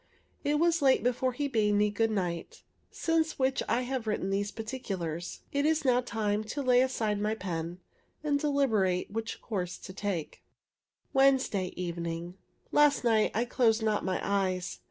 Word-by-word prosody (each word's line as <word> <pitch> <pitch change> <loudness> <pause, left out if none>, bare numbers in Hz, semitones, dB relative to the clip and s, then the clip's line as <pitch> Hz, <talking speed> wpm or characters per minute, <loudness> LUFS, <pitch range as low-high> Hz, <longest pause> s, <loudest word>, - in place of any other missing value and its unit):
It 295 +1 +2
was 335 +1 +2
late 270 -2 +4
before 250 +1 +1
he 285 +3 -1
bade 215 -5 +2
me 210 0 +3
good 225 +2 +1
night, 180 -5 -3 0.3
since 325 -1 0
which 265 0 +1
I 245 +2 +2
have 250 -2 -3
written 200 -2 -1
these 200 +1 0
particulars. 190 -8 -5
It 285 0 +1
is 310 -1 +2
now 250 -1 +4
time 215 -3 -1
to 280 +7 -4
lay 250 -1 +5
aside 220 -5 0
my 215 +1 0
pen, 175 -3 -4 0.4
and 290 -2 +1
deliberate 225 -13 +1
what 225 +1 -4
course 180 -5 -3
to 185 - -10
take. 190 -6 -4 0.7
Wednesday 265 -9 +3
evening. 170 -1 -4 0.4
Last 295 -2 +4
night 225 -3 +3
I 230 +2 +1
closed 230 -2 +2
not 215 -1 +1
my 185 -1 -1
eyes. 185 -3 -1
220 Hz, 160 wpm, -30 LUFS, 190-260 Hz, 0.7 s, lay